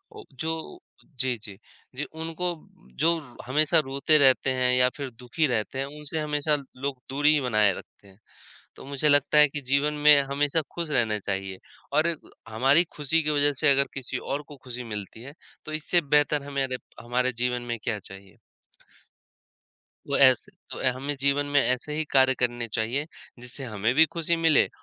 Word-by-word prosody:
औ - - -10 0.2
जो 160 0 -2 0.4
अ - - -30
जी, 130 -2 0
जी, 105 -3 -9 0.4
जी, 140 - -3
उनको 160 +3 -5 0.5
जो 170 +1 +3
रो 135 -6 -15
हमेशा 155 +5 +3
रोते 140 +3 +2
रहते 135 -2 +4
हैं 125 -1 +1
या 125 0 +4
फिर 140 -2 -4
दुखी 125 +6 0
रहते 120 +1 -2
हैं, 135 - -1
उनसे 150 +2 -5
हमेशा 150 0 0 0.2
लोग 135 0 -3
दूरी 145 +3 +3
ही 150 - +2
बनाए 110 -5 +3
रखते 100 - -14
हैं। 95 +1 -19 0.6
तो - - -11
मुझे 140 +2 0
लगता 145 +1 +4
है 150 0 +7
कि 145 +1 -5
जीवन 145 +2 +2
में 145 -2 +8
हमेशा 145 +3 +1
खुश 170 -2 -4
रहना 115 -6 +1
चाहिए 95 -1 -4 0.3
और 160 +2 +3 0.4
हमारी 135 +9 +3
खुशी 150 +2 +1
की 150 - -1
वज़ह 145 -1 +3
से 155 - +4
अगर 140 0 +2
किसी 130 -1 -4
और 140 +3 -4
को 145 - -11
खुशी 125 -1 -6
मिलती 105 -1 -7
है, 140 +3 -10 0.3
तो 155 - -7
इससे 155 +3 +1 0.2
बेहतर 145 0 +2
हमारे 135 -2 -2 0.2
हमारे 125 +2 0
जीवन 125 0 0
में 120 - -3
क्या 110 -3 -1
चाहिए। 95 -1 -11 1.7
वो - - +1
ऐसे - - +4 0.2
तो - - -6
अ, 130 - +2
हमें 140 +3 -3
जीवन 140 +1 +2
में - - +7
ऐसे 130 +4 -1
ही 155 - 0
कार्य 130 -1 +5
करने 120 -1 -1
चाहिए, 115 +6 -2 0.3
जिससे 125 +3 -9
हमें 110 0 -1
भी 160 +2 +7
खुशी 170 0 +1
मिले 165 -2 +4
140 Hz, 185 wpm, -26 LUFS, 125-150 Hz, 1.7 s, में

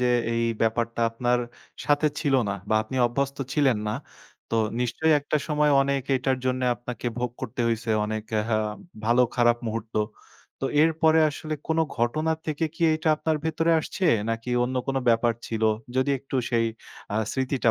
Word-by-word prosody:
যে, 125 - +2 0.3
এই 115 0 0 0.2
ব্যাপারটা 115 +1 0
আপনার 120 +1 +1 0.5
সাথে 145 +1 +3
ছিল 140 -4 +1
না - - 0 0.2
বা 110 - +2
আপনি 120 +4 -6
অভ্যস্ত 140 +3 -2 0.2
ছিলেন 135 -7 +3
না। - - -1 0.6
তো 115 - 0 0.2
নিশ্চয় 125 +7 +1
একটা 145 - -1
সময় 150 0 +2
অনেক 140 -1 0
এটার 130 0 0
জন্যে 130 0 0
আপনাকে 120 0 -7
ভোগ 125 -1 -1
করতে 120 -2 -5
হইছে 115 0 -1
অনেক, 110 0 -3 0.2
আ - - -1 0.6
ভালো-খারাপ 120 0 +3
মুহূর্ত। 110 0 -4 0.7
তো - - -2 0.2
এরপরে 160 0 +4
আসলে 155 +1 -5
কোনো 160 0 +2
ঘটনা 155 +7 +1
থেকে 155 +1 -1
কি - - -5
এটা 155 +1 -1
আপনার 160 0 0
ভেতরে 165 +1 +1
আসছে? 185 - -4 0.3
নাকি 115 +2 -4 0.2
অন্য 130 +1 -3
কোনো 135 -1 0
ব্যাপার 115 0 +4
ছিল? 110 -1 -3 0.3
যদি 130 +2 +2
একটু 135 +1 -5
সেই 115 -1 +2 0.5
আ - - -1 0.2
স্মৃতিটা 130 -3 +1
125 Hz, 165 wpm, -25 LUFS, 115-150 Hz, 0.7 s, এরপরে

